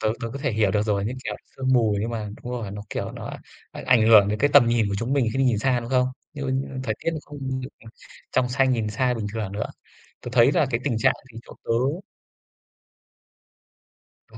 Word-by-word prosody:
tớ 110 0 +1
tớ 115 - -3
có 140 - -5
thể 140 -2 -1
hiểu 105 -2 +2
được 105 +1 +1
rồi, 100 -2 0
như 115 - -2
kiểu - - -3 0.2
sương 130 0 0
mù 110 -5 +3
nhưng 115 +3 -2
mà 110 -3 -4
đúng 125 - -5
rồi, 115 -5 -4
nó, 105 0 -7
kiểu, - - -3
nó - - -7 0.4
ảnh - - -8
ảnh 115 -3 +4
hưởng 105 -3 +8
đến 105 - -1
cái 145 +4 +3
tầm 120 - +7
nhìn 115 -3 +2
của 100 - -2
chúng 120 +4 -2
mình 130 -5 +2
khi - - -2
mình 135 - +3
nhìn 115 -4 +2
xa, 125 +1 +1
đúng 115 +2 -8
không? 125 -1 +3 0.3
Như 145 -2 -7 0.4
thời 110 -4 -1
tiết - - +2
nó 155 - -3
không 145 0 -10 0.2
được 130 - -6 0.6
trong 125 -1 +2
xanh 130 +1 +2
nhìn 115 -3 0
xa 125 +3 +1
bình 110 -3 -3
thường 105 -4 -4
nữa. 105 +1 -2 0.5
Tớ 120 - -7
thấy 125 +2 +5
là 150 - +3
cái 115 - 0
tình 120 -6 0
trạng - - +3 0.2
thì 115 - -9
chỗ - - -11
tớ - - -6 2.6
Ờ, - - -14
115 Hz, 240 wpm, -24 LUFS, 110-130 Hz, 2.6 s, hưởng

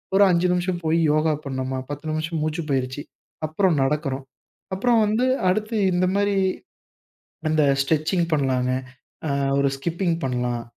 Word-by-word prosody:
ஒரு 200 - +7
5 175 +1 +2
நிமிஷம் 180 0 -1
போய் 165 +1 +2
யோகா 155 0 +2
பண்ணோமா, 130 -1 -3
10 145 +2 -6
நிமிஷம் 155 +1 -2
மூச்சு 155 +2 -2
பயிற்சி, 130 +1 -1 0.5
அப்புறம் 175 +2 +2
நடக்கிறோம். 135 -1 -1 0.5
அப்புறம் 235 +4 +3
வந்து 220 +4 +1 0.2
அடுத்து 215 +4 -1 0.2
இந்த 180 +1 +2
மாரி, 205 0 +2 1.1
அந்த 155 -1 +3 0.2
ஸ்ட்ரெச்சிங் 160 +4 +1
பண்ணலாங்க. 130 -3 +1 0.6
ஆ - - -1 0.3
ஒரு 140 - +3
ஸ்கிப்பிங் 170 +3 -1
பண்ணலாம். 125 -2 -1
155 Hz, 135 wpm, -23 LUFS, 135-180 Hz, 1.1 s, ஒரு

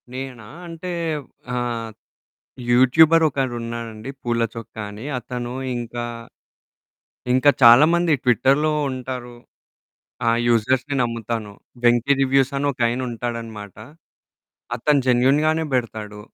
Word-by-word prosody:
నేనా 130 -4 -7 0.2
అంటే 170 +2 -6 0.6
ఆహ్, 120 -2 -3 0.8
యూట్యూబరోకరున్నాడండి 125 -5 +2
పూల 120 -1 0
చొక్క 115 -2 -9 0.2
అని, 105 +5 -9
అతను 120 0 -6 0.2
ఇంక, 120 0 -6 1.4
ఇంక 130 +2 +1 0.2
చాలా 120 +5 +9
మంది 170 -2 +2
ట్విట్టర్‌లో 135 +5 +3 0.2
ఉంటారు. 125 -2 -6 0.9
ఆ! - - +4 0.2
యూజర్స్‌ని 130 +5 +1
నమ్ముతాను. 115 -2 -3 0.3
వెంకి 120 +3 +4
రివ్యూసని 135 +1 +2
ఒకాయన 120 -1 0
ఉంటాడన్నమాట, 115 -3 -6 1.0
అతను 145 +4 +2
జెన్యూన్‌గానే 145 +6 +3
బెడతాడు. 110 -4 -3
120 Hz, 90 wpm, -22 LUFS, 115-135 Hz, 1.4 s, చాలా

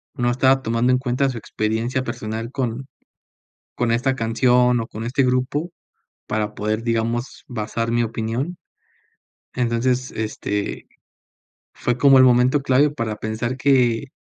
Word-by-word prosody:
no 120 -3 +1
estaba 130 +2 +3
tomando 115 +2 +1
en 125 - +4
cuenta 130 +1 0
su 125 - -5
experiencia 115 +4 -2
personal 115 -1 -5
con 130 -1 -3 0.9
con 120 -1 0
esta 130 +3 +1
canción 125 +1 +3
o 115 - -3
con 110 - -7
este 130 +4 +1
grupo 130 +6 0 0.6
para 105 0 -2
poder, 110 +1 -2
digamos, 115 +1 -2
basar 115 0 -3
mi 120 0 +2
opinión. 115 +8 -3 1.0
Entonces, 125 +1 0
este, 105 -2 -3 0.9
fue 120 - -1
como 135 +1 +6
el 130 - +8
momento 125 +3 +4
clave, 140 +2 +3
para 115 -6 -3
pensar 110 +4 -3
que 130 -2 +2
120 Hz, 135 wpm, -21 LUFS, 115-130 Hz, 1.0 s, el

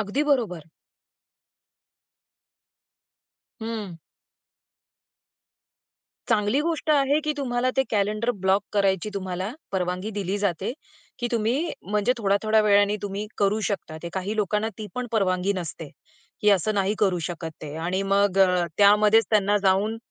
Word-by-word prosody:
अगदी 210 +8 -1
बरोबर. 220 - 0 3.0
हं. 220 -6 -5 2.3
चांगली 220 +3 +2
गोष्ट 320 -1 -1
आहे, 285 0 +3
की 305 - +1
तुम्हाला 255 -2 0
ते 265 - +4
कॅलेंडर 215 +3 0
ब्लॉक 195 +2 +3
करायची 195 -1 +1
तुम्हाला 185 0 -3 0.2
परवानगी 185 +2 -2
दिली 200 -1 -2
जाते, 195 +1 -1 0.5
की 240 - -1
तुम्ही 240 +9 0 0.2
म्हणजे 210 +4 +2
थोड्या-थोड्या 215 +1 +2
वेळाने 205 0 +4
तुम्ही 205 +1 -4
करू 200 +1 +2
शकता 185 -6 -4
ते. 170 - -4
काही 195 +3 -3
लोकांना 210 +1 0
ती 215 - -5
पण 250 0 -3
परवानगी 190 -2 +1
नसते, 165 -3 -6 0.5
की 210 - +4
असं 205 +2 +2
नाही 200 +1 +1
करू 190 -4 +2
शकत 170 -2 -5
ते 150 0 -7
आणि 175 +4 -1
मग 195 0 +2 0.4
त्यामध्येच 210 +2 +6
त्यांना 205 -1 +3
जाऊन 195 +3 +2
205 Hz, 125 wpm, -25 LUFS, 190-220 Hz, 3.0 s, त्यामध्येच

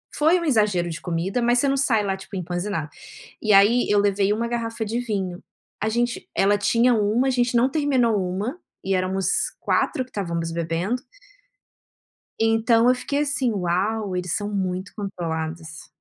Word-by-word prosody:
Foi 320 +4 +3
um 340 - -4
exagero 210 - +2
de 160 - -5
comida, 180 +6 -2
mas 240 +1 +3
você 280 - +2
não 275 - +1
sai 235 -6 +2
lá, 195 -1 -1
tipo, 195 - -10
empazinada. 175 -3 -3 0.5
E 215 -2 +2
aí 210 +5 +5
eu 205 - +4
levei 200 0 +2
1 230 +2 -2
garrafa 230 -1 -3
de 225 +3 -2
vinho. 195 -6 -3 0.4
A 220 - +1
gente 240 +2 -1
ela 205 +1 +3
tinha 235 +4 +3
1, 220 +5 +1
a - - +3
gente 245 -1 +1
não 240 +3 +4
terminou 260 -7 +1
1, 205 - -3 0.3
e 190 0 0
éramos 185 0 -1 0.3
4 255 - 0
que 255 - -23
estávamos 170 -4 -3
bebendo. 170 +9 -2 1.4
Então 225 +1 +3
eu 255 - +4
fiquei 280 +3 -2
assim: 280 -4 +1
"Uau, 195 +2 -1
eles 180 -1 -2
são 205 -1 -2
muito 185 0 -3
controlados". 160 -5 -5
205 Hz, 170 wpm, -23 LUFS, 185-240 Hz, 1.4 s, aí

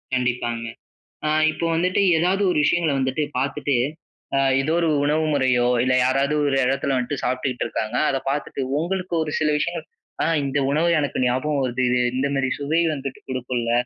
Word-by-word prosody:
கண்டிப்பாங்க. 120 -2 -1 0.6
அ - - +2 0.2
இப்போ 170 - -3
வந்துட்டு 180 +4 +1 0.2
ஏதாவது 185 +4 +1
ஒரு 170 - 0
விஷயங்களை 165 -2 +2
வந்துட்டு 130 +3 -1 0.2
பார்த்துட்டு, 140 +1 0 0.6
அ - - +3 0.2
ஏதோ 155 +4 -1
ஒரு 165 - +1 0.2
உணவு 155 +2 +1
முறையோ 125 -3 +2 0.2
இல்லை, 130 0 +2
யாராவது 135 +3 +1
ஒரு 140 -1 +1
இடத்தில 135 +1 0
வந்துட்டு 130 +2 -2
சாப்பிட்டுகிட்டு 130 0 -1
இருக்காங்க. 110 0 -3
அத 135 - 0
பார்த்துட்டு 140 -1 -3 0.2
உங்களுக்கு 185 +1 -3
ஒரு 150 - -4
சில 155 - +2
விஷயங்கள் 170 +3 -3 0.4
"அ - - +1 0.2
இந்த 140 +1 -1
உணவு 160 +4 +2
எனக்கு 135 -3 -1
ஞாபகம் 135 +4 0
வருது. 130 0 -1
இது 125 - +2 0.2
இந்த 135 +2 +1
மேரி 130 -1 0
சுவை 155 +4 +1
வந்துட்டு 135 -2 -6
குடுக்கும்ல. 125 -2 -2
140 Hz, 170 wpm, -22 LUFS, 130-155 Hz, 0.6 s, அ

